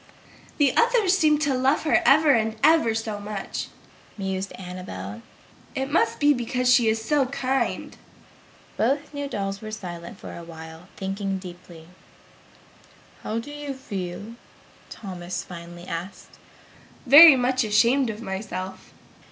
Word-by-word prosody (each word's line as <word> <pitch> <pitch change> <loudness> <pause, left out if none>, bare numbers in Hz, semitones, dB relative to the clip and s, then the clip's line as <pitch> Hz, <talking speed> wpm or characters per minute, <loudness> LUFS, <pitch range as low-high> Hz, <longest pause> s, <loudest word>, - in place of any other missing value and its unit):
"The 285 -4 +3
others 465 -6 +3
seem 305 -5 +3
to 285 -3 +1
love 260 +3 +1
her 310 - +3
ever 295 +3 +6
and 220 -2 +1
ever 310 -7 +4
so 220 -2 -3
much!" 205 -1 -5 0.5
mused 190 -1 -3
Annabel. 115 - -8 0.5
"It 270 +1 -3
must 330 - +1
be 290 0 +5
because 250 0 +1
she 240 -2 +4
is 220 0 0
so 285 0 +2
kind." 265 -1 -2 0.8
Both 280 +6 0
new 285 0 -4
dolls 195 -5 -4
were 215 - -7
silent 175 -5 -8
for - - -9
a 170 - -9
while, 160 +1 -11
thinking 195 0 -3
deeply. 175 -3 -12 1.3
"How 220 - -3
do 230 +5 -5
you 290 -2 -6
feel?" 205 -3 -6 0.6
Thomas 180 -3 -6
finally 175 0 -10
asked. 175 +3 -7 0.7
"Very 290 +3 +10
much 255 0 +1
ashamed 230 +5 +3
of 220 +1 -6
myself!" 190 -2 -6
220 Hz, 135 wpm, -24 LUFS, 185-275 Hz, 1.3 s, Very